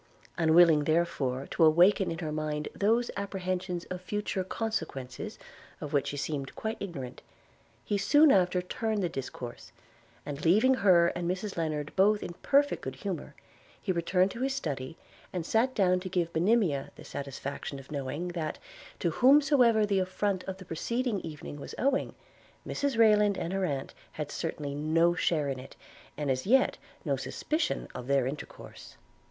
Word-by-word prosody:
Unwilling, 165 Hz, -2 st, +5 dB
therefore, 155 Hz, -5 st, 0 dB
to -, -, +2 dB
awaken 180 Hz, +5 st, +5 dB
in 165 Hz, -, -3 dB
her 160 Hz, -2 st, -4 dB
mind 150 Hz, -1 st, -2 dB
those 230 Hz, +4 st, +1 dB
apprehensions 185 Hz, -2 st, -3 dB
of 180 Hz, 0 st, -4 dB
future 200 Hz, 0 st, -2 dB
consequences, 160 Hz, -, -4 dB, 0.4 s
of 150 Hz, -, -6 dB
which 140 Hz, -2 st, +2 dB
she 145 Hz, -, -4 dB
seemed 140 Hz, -1 st, -4 dB
quite 220 Hz, 0 st, -3 dB
ignorant, 145 Hz, -11 st, -6 dB, 0.6 s
he 205 Hz, -, 0 dB
soon 290 Hz, +8 st, +6 dB
after 180 Hz, -1 st, +3 dB
turned 215 Hz, +2 st, -2 dB
the 175 Hz, -, 0 dB
discourse; 125 Hz, -4 st, -7 dB, 0.5 s
and, 145 Hz, 0 st, -6 dB
leaving 215 Hz, +10 st, +5 dB
her 180 Hz, -8 st, +5 dB
and 175 Hz, 0 st, -3 dB
Mrs 190 Hz, +3 st, -3 dB
Lennard 155 Hz, -3 st, -3 dB
both 205 Hz, +2 st, +4 dB
in -, -, -5 dB
perfect 285 Hz, +1 st, +3 dB
good 130 Hz, 0 st, -5 dB
humor, 160 Hz, -2 st, -5 dB, 0.4 s
he 195 Hz, -, -2 dB
returned 180 Hz, +2 st, +2 dB
to 235 Hz, -, -7 dB
his 270 Hz, 0 st, 0 dB
study, 140 Hz, -, -4 dB, 0.3 s
and 175 Hz, -3 st, -3 dB
sat 245 Hz, +7 st, +1 dB
down 185 Hz, -3 st, +3 dB
to 185 Hz, +1 st, -6 dB
give 175 Hz, -2 st, -1 dB
Monimia 175 Hz, -5 st, +2 dB
the -, -, -12 dB
satisfaction 140 Hz, 0 st, -5 dB
of 135 Hz, +1 st, -12 dB
knowing, 145 Hz, +5 st, -3 dB
that, 165 Hz, -3 st, -3 dB, 0.4 s
to 170 Hz, -, 0 dB
whomsoever 255 Hz, -, +5 dB
the 200 Hz, -2 st, +1 dB
affright 185 Hz, +1 st, -1 dB
of 190 Hz, 0 st, -5 dB
the 190 Hz, -, -11 dB
preceding 235 Hz, +7 st, -1 dB
evening 150 Hz, -3 st, -8 dB
was -, -, -8 dB
owing, 275 Hz, +1 st, 0 dB, 0.5 s
Mrs 280 Hz, -4 st, -1 dB
Rayland 210 Hz, -3 st, +5 dB
and 170 Hz, -, -3 dB
her 195 Hz, -1 st, 0 dB
aunt 140 Hz, -5 st, -3 dB, 0.2 s
had 150 Hz, -1 st, -5 dB
certainly 150 Hz, -3 st, -4 dB
no 160 Hz, +4 st, +2 dB
share 160 Hz, -4 st, +1 dB
in 135 Hz, -2 st, -3 dB
it, 130 Hz, -, -11 dB, 0.4 s
and 145 Hz, -2 st, 0 dB
as 130 Hz, +6 st, -2 dB
yet 260 Hz, +4 st, +3 dB, 0.3 s
no -, -, +1 dB
suspicion 310 Hz, +2 st, -2 dB
of 125 Hz, 0 st, -7 dB
their 140 Hz, -2 st, +2 dB
intercourse. 140 Hz, +4 st, -8 dB
175 Hz, 165 wpm, -29 LUFS, 150-205 Hz, 0.6 s, soon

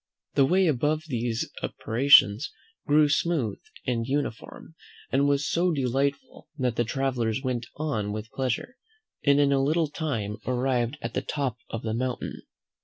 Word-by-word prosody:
The 135 Hz, -1 st, +4 dB
way 185 Hz, +4 st, +3 dB
above 150 Hz, +1 st, +1 dB
these 120 Hz, -2 st, -1 dB
apparitions 115 Hz, -1 st, +4 dB, 0.4 s
grew 150 Hz, +1 st, +5 dB
smooth 145 Hz, -, 0 dB, 0.3 s
and 115 Hz, -2 st, -1 dB
uniform, 140 Hz, +2 st, -4 dB, 0.4 s
and 140 Hz, +2 st, +3 dB
was 145 Hz, 0 st, +1 dB
so 175 Hz, +1 st, +2 dB
delightful, 140 Hz, 0 st, -1 dB
that 125 Hz, -4 st, 0 dB
the 120 Hz, -, +2 dB
travellers 125 Hz, -1 st, -1 dB
went 120 Hz, -3 st, -2 dB
on 135 Hz, -10 st, -2 dB
with 110 Hz, +1 st, -6 dB
pleasure, 135 Hz, -, -2 dB, 0.5 s
and 140 Hz, 0 st, +4 dB
in 140 Hz, -1 st, +4 dB
a 135 Hz, -1 st, +3 dB
little 155 Hz, +2 st, +1 dB
time 115 Hz, -11 st, -3 dB
arrived 125 Hz, +1 st, 0 dB
at 115 Hz, -, -4 dB
the -, -, 0 dB
top 135 Hz, -5 st, -2 dB
of 115 Hz, -, -5 dB
the 110 Hz, -1 st, -2 dB
mountain. 125 Hz, +1 st, -3 dB
135 Hz, 150 wpm, -26 LUFS, 115-145 Hz, 0.5 s, grew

